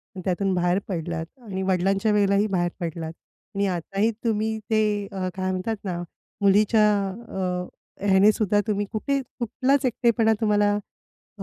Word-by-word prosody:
आणि 185 - -6
त्यातून 190 +1 0
बाहेर 175 +1 +2
पडलात 165 -3 -3 0.2
आणि 195 -5 -5
वडिलांच्या 195 +3 +2
वेळेलाही 200 0 +3
बाहेर 175 -3 0
पडलात. 165 -2 -4 0.4
आणि 200 0 +1
आताही 195 +5 0
तुम्ही 220 -1 0
ते 220 -1 +3 0.3
अ, 190 -1 -3
काय 185 0 -2
म्हणतात 185 +4 -2
ना, 180 -3 -3 0.4
मुलीच्या 210 +2 +4 0.2
अ, 185 -4 -4 0.4
ह्याने 195 +1 +6
सुद्धा, 210 -1 +1
तुम्ही 205 -1 0
कुठे 275 +6 0 0.2
कुठलाच 255 +4 +1
एकटेपणा 235 -2 +3
तुम्हाला 205 -1 +3 0.6
अ, - - -5
200 Hz, 140 wpm, -24 LUFS, 185-215 Hz, 0.6 s, ह्याने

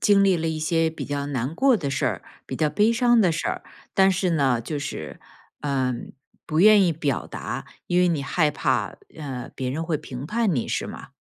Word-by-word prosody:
经 200 -2 +5
历 190 -2 +4
了 165 0 -1
一 160 -1 -2
些 165 +1 +1
比 160 - -6
较 140 0 -3
难 135 +1 -2
过 260 +5 +4
的 145 -8 -3
事 135 - 0
儿， - - -2 0.2
比 - - -5
较 155 - +2
悲 210 +9 +3
伤 240 0 +4
的 185 - +4
事 160 - -2
儿， - - -3 0.3
但 190 0 +5
是 185 0 0
呢， 135 -7 +2
就 145 +5 -4
是， - - -6 0.4
嗯， 130 -4 -2 0.3
不 155 +1 0
愿 210 0 +7
意 170 - +2
表 145 -5 -2
达， - - -5 0.2
因 180 0 +2
为 180 - +4
你 160 -5 0
害 155 +2 +1
怕， 150 - -1 0.2
呃， 135 -5 -6
别 130 -1 -3
人 155 +4 -2
会 160 -2 0
评 135 -2 -7
判 215 -2 +1
你 120 - -1
是 - - -1
吗？ - - -9
160 Hz, 235 characters per minute, -24 LUFS, 140-185 Hz, 0.4 s, 愿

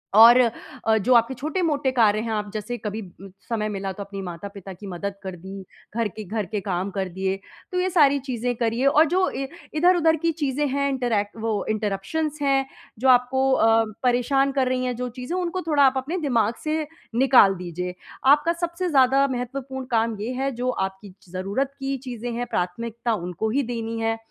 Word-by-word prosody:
और 230 +3 +10
अ, 230 -1 -1
जो 235 +5 +2
आपके 235 +2 +4
छोटे-मोटे 295 0 0
कार्य 220 -4 +3
हैं, 230 - -3
आप 210 -1 -2
जैसे 220 +3 -4
कभी 215 0 -4 0.2
उम, 195 - -10 0.2
समय 215 -2 -1
मिला, 195 -1 -3
तो 200 - -6
अपनी 195 0 -7
माता-पिता 195 +2 -7
की 200 +3 -10
मदद 195 +2 -4
कर 190 -1 -5
दी, 190 +2 -9 0.3
घर 230 -2 +1
के 215 +2 -8
घर 210 +1 -3
के 210 -1 -3
काम 185 0 -2
कर 190 -1 -2
दिए, 190 +2 -2 0.4
तो 365 - 0
ये 370 +1 +1
सारी 290 -6 +4
चीज़ें 245 -2 -2
करिए 230 +3 0
और 300 +3 +6
जो 370 +3 +2
ए 270 0 -4 0.3
इधर-उधर 330 0 +4
की 335 - +2
चीज़ें 295 -2 -1
हैं, 280 +1 0
इंटरैक्ट 235 -7 -1
वो 220 -3 -1
इंटरप्शंस 215 +9 -2
हैं, 275 -1 +2 0.3
जो 260 +1 +3
आपको 260 +2 +4
अ, 225 -2 +4 0.2
परेशान 255 +3 +2
कर 265 -2 +1
रही 255 0 0
हैं, 250 -1 -1
जो 250 +1 -3
चीज़ें, 320 +9 -3
उनको 365 +1 -2
थोड़ा 295 -3 +4
आप 265 0 +3
अपने 295 +8 -2
दिमाग 230 -4 +2
से 310 -1 -1 0.3
निकाल 245 -6 +6
दीजिये। 180 0 -5 0.4
आपका 300 +3 +2
सबसे 345 +1 -2
ज़्यादा 270 -1 +4
महत्वपूर्ण 260 +1 -4
काम 225 -1 +1
ये 230 - -3
है, 270 +2 -1
जो 250 0 -2 0.2
आपकी 190 0 -13 0.2
ज़रूरत 200 +10 -2
की 270 0 -2
चीज़ें 240 0 -4
हैं, 245 +1 -2
प्राथमिकता 230 +6 -2
उनको 180 +2 -3
ही 275 +5 +1
देनी 230 0 -4
है 225 0 0
240 Hz, 195 wpm, -24 LUFS, 210-275 Hz, 0.4 s, और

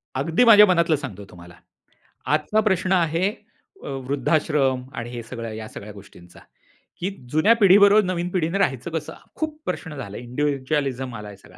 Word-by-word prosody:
अगदी 160 - +1
माझ्या 210 -3 +9
मनातलं 170 -4 +2
सांगतो 110 -9 -7
तुम्हाला. 85 -1 -14 0.7
आजचा 155 +8 +1
प्रश्न 190 -4 0
आहे 170 +1 +2 0.5
अ, - - -8
वृद्धाश्रम 135 0 0
आणि 115 0 -5
हे 120 -1 -6
सगळं 115 0 -7
या 110 0 -7
सगळ्या 105 +1 -10
गोष्टींचा, 95 -3 -15 0.6
की 185 - -2 0.2
जुन्या 155 +9 +4
पिढीबरोबर 205 0 +6
नवीन 180 -1 -2
पिढीने 175 0 -1
राहायचं 155 -5 -1
कसं. 160 -2 -4 0.2
खूप 310 -1 -4
प्रश्न 160 -3 -5
झाले 105 -7 -7
इंडिव्हिज्युअलिझम 135 0 -2
आला 105 -1 -8
आहे 100 -1 -11
सगळा. - - -19
150 Hz, 155 wpm, -23 LUFS, 120-180 Hz, 0.7 s, माझ्या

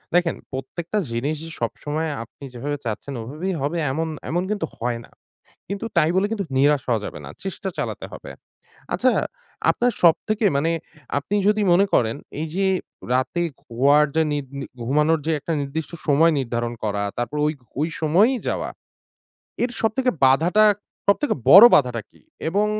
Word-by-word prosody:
দেখেন, 175 -2 +3 0.2
প্রত্যেকটা 160 +9 -4
জিনিস 135 +7 -1
যে 165 - -7
সবসময় 150 +7 -2
আপনি 120 +4 -17
যেভাবে 145 +4 -3
চাচ্ছেন, 115 +5 -4
ওভাবেই 155 +11 -4
হবে 150 +5 -1
এমন 160 +4 -1 0.2
এমন 175 +3 0
কিন্তু 205 -6 -1
হয় 120 0 -2
না। - - -24 0.6
কিন্তু 200 +3 -4
তাই 160 -1 +5
বলে 195 +2 +3
কিন্তু 205 -3 -2
নিরাশ 145 0 +4
হওয়া 115 -3 +2
যাবে - - -7
না; - - -8
চেষ্টা 195 0 -4
চালাতে - - -3
হবে। - - -9 0.6
আচ্ছা, - - +3 0.6
আপনার 245 +1 +1
সবথেকে 210 +6 +3
মানে 165 +4 +1 0.5
আপনি 170 +8 -2
যদি 210 0 +3
মনে 190 +3 +5
করেন 115 0 +3 0.3
এই 160 - -2
যে 195 0 +1 0.5
রাতে 130 +7 0 0.2
ঘুয়ার 140 +5 +4
যে 160 - +4
নিদ 145 -2 -2
নির 135 - -6 0.2
ঘুমানোর 150 +5 +3
যে - - +2
একটা 165 - -3
নির্দিষ্ট 150 +3 -4 0.2
সময় 160 +3 +5
নির্ধারণ 120 -2 -2
করা, 100 -1 -1
তারপর 120 +5 -2
ওই 150 - 0 0.3
ওই 160 - +1
সময়ই 195 - +4
যাওয়া। - - -1 0.9
এর 245 - 0
সবথেকে 250 +3 +1
বাধাটা, 170 +11 +5 0.4
সবথেকে 200 +9 +2 0.2
বড় 195 +8 +12
বাধাটা 125 -5 +2
কী? - - -24 0.3
এবং 205 +4 +2
155 Hz, 160 wpm, -23 LUFS, 135-190 Hz, 0.9 s, বড়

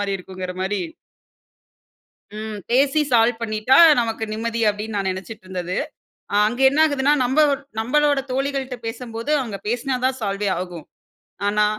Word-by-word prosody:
மாரி 200 -1 -1
இருக்குங்கற 185 0 -7
மாரி 195 +2 -1 1.6
ம் 215 -1 -5
பேசி 275 +4 +3
சால்வ் 235 0 +3
பண்ணிட்டா 215 +3 +2 0.2
நமக்கு 225 -1 -2
நிம்மதி 230 +1 -2
அப்டின்னு 210 +1 -4
நான் 195 -1 0
நினைச்சிடிருந்தது. 185 -2 -6 0.6
அ - - +2
அங்க 245 +4 -4
என்னாகுதுன்னா, 290 -1 +3
நம்ப 260 +5 +1 0.4
நம்பளோட 290 +4 +2
தோழிகள்ட்ட 270 -1 -2
பேசம்போது 230 +3 -5
அவுங்க 225 -7 -4
பேசுனா 250 +3 -1
தான் 260 0 0
சால்வே 200 -1 -1
ஆகும். 175 -4 -7 0.6
ஆனா 210 +1 +2
225 Hz, 125 wpm, -22 LUFS, 205-260 Hz, 1.6 s, பேசி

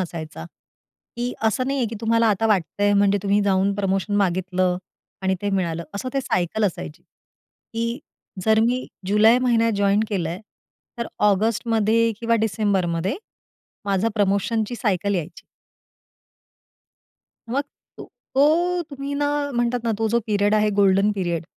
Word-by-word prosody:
असायचा. 160 - -6 0.7
की 245 +1 -2
असं 225 +3 +1
नाही 275 0 -1
आहे, 245 - +1
की 230 - -7
तुम्हाला 230 0 +2
आता 215 +2 +1
वाटतंय 205 0 +1
म्हणजे 200 0 +3
तुम्ही 200 0 +2
जाऊन 195 0 +2
प्रमोशन 195 0 -1
मागितलं 185 -1 +1 0.5
आणि 190 0 +1
ते 205 - 0
मिळालं. 170 -4 -1
असं 200 +6 -4
ते 275 - +1
सायकल 210 -3 -1
असायची, 80 - -4
की 230 +2 -8 0.5
जर 220 0 +4
मी 250 +2 -1 0.2
जुलै 215 +4 +5
महिन्यात 230 -3 +2
जॉइन 200 +1 +2
केलंय, 180 -4 -2 0.6
तर 235 - -2 0.2
ऑगस्टमध्ये 225 +2 +1
किंवा 230 0 +1
डिसेंबरमध्ये 190 -4 0 0.7
माझं 200 +2 +1
प्रमोशनची 210 +3 0
सायकल 200 -3 0
यायची. 175 -1 -5 2.1
मग 275 +4 0 0.3
तो - - -8 0.3
तो 340 +6 +3
तुम्ही 280 0 -5
ना 290 0 0 0.3
म्हणतात 240 0 0
ना, 230 - +1
तो 225 0 +1
जो 235 +2 +2
पिरियड 205 -1 +2
आहे, 215 0 +3
गोल्डन 200 0 +3
पिरियड. 175 -5 -2
205 Hz, 135 wpm, -22 LUFS, 190-230 Hz, 2.1 s, जुलै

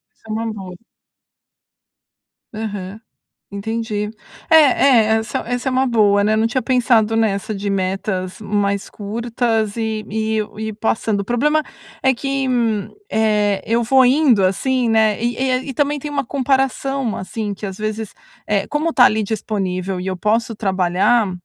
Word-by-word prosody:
isso - - -38
é 215 - -6
uma 225 0 -2
boa. 190 -3 -8 1.8
Aham. 205 -2 -5 0.5
Entendi. 210 0 -3 0.4
É 320 - +6
é, 270 -5 +5 0.2
essa 220 - -3
essa 245 +2 -2
é - - -3
uma 260 +1 +2
boa, 205 -4 +3
né, 215 +1 +2
não 220 +1 +2
tinha 255 +2 -1
pensado 235 -4 +2
nessa 215 -2 0
de 200 0 -3
metas 190 0 -2
mais 200 -1 -1
curtas. 225 0 -2
E 220 -1 -2
e 220 +1 -1
eu 215 0 -4
ir 220 -1 -3
passando, 220 -1 -1
o - - -4
problema 295 +8 +1 0.4
é 265 - +4
que, 275 +1 -2 0.6
eh, 210 -2 +1
eu 230 +1 +1
vou 260 +3 +5
indo 250 -6 +4
assim, 245 +6 +1
né, 220 -1 +2
e 240 0 0
e 260 0 +1
aí 255 +2 -1
e 270 - -4
também 290 +2 0
tem 295 - -6
uma 280 -2 -2
comparação, 270 -1 0
assim, 205 +2 -4
que 200 - -7
às 190 - -7
vezes, 215 0 -4 0.3
eh, 205 -1 +1
como 300 +3 0
está 250 -6 +5
ali 220 -3 +3
disponível 195 -4 -3
e 185 - -5
eu 185 -1 -2
posso 225 +3 0
trabalhar 195 +2 +1
220 Hz, 160 wpm, -19 LUFS, 205-250 Hz, 1.8 s, É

